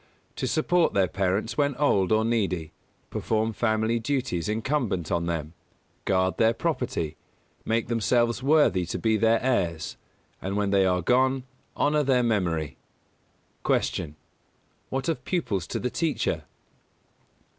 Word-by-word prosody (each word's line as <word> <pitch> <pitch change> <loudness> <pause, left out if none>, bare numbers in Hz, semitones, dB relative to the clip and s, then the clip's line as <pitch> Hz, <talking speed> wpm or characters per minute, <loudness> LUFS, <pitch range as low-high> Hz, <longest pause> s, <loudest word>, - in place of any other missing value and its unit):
To - - -1
support 175 +2 +2
their 95 -2 +4
parents 95 - -1
when 145 -2 +2
old 105 -10 +2
or 110 0 +3
needy; 95 -9 -1 0.4
perform 110 0 0
family 110 +1 +1
duties 115 - -1
incumbent 110 - -1
on 85 0 0
them; 80 -2 -3 0.5
guard 95 -1 +1
their 115 0 +4
property; 120 - -2 0.5
make 115 0 0
themselves 120 +1 +1
worthy 135 - +3
to - - -3
be 110 -1 +1
their 115 +1 +3
heirs, 85 -11 0 0.4
and 95 +2 -2
when 100 -1 0
they 95 -1 +4
are 90 -1 +1
gone, 130 +4 +2 0.3
honour 150 +1 +2
their 130 -3 +2
memory. 85 - 0 0.9
209. - - +2
Q. 75 -1 -5 0.8
_What 135 - -3
of 155 -7 -1
pupils 120 - -1
to - - -3
the 125 - -2
teacher? 155 -9 -1
110 Hz, 135 wpm, -26 LUFS, 95-130 Hz, 0.9 s, their